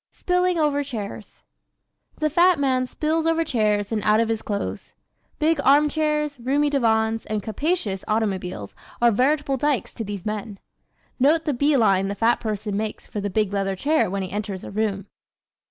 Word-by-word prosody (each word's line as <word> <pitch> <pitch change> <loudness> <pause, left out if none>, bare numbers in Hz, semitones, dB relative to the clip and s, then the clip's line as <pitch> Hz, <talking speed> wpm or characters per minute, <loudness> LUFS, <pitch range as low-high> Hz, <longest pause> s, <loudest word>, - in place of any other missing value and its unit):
Spilling 360 -1 0
Over 295 -2 +1
Chairs 205 - -7 0.8
¶ - - -22
The 305 0 0
fat 345 +3 +5
man 260 -2 +1
spills 315 +4 -1
over 330 0 +2
chairs 210 -7 0
and 220 -2 0
out 215 +1 +3
of 230 0 +1
his 225 -1 -1
clothes. 200 -1 -4 0.4
Big 315 -1 +2
arm 290 +2 +5
chairs, 300 -2 -1
roomy 285 +4 +1
divans 225 -4 +1
and 215 -2 -2
capacious 220 - -2
automobiles 190 - -2 0.3
are 235 0 +5
veritable 275 +4 +1
dykes 290 0 0
to 225 - -5
these 200 -3 -6
men. 210 -1 -4 0.6
Note 310 +5 +3
the 295 - 0
bee 285 +3 +2
line 195 -4 +3
the 200 - -3
fat 230 +3 +2
person 210 -2 -3
makes 215 +1 -4
for 210 - -5
the 205 - -2
big 205 0 0
leather 195 -1 -1
chair 300 - +1
when 195 +1 -2
he 185 - -6
enters 200 -2 -4
a - - -8
room! 200 -2 -1
230 Hz, 180 wpm, -23 LUFS, 205-295 Hz, 0.8 s, fat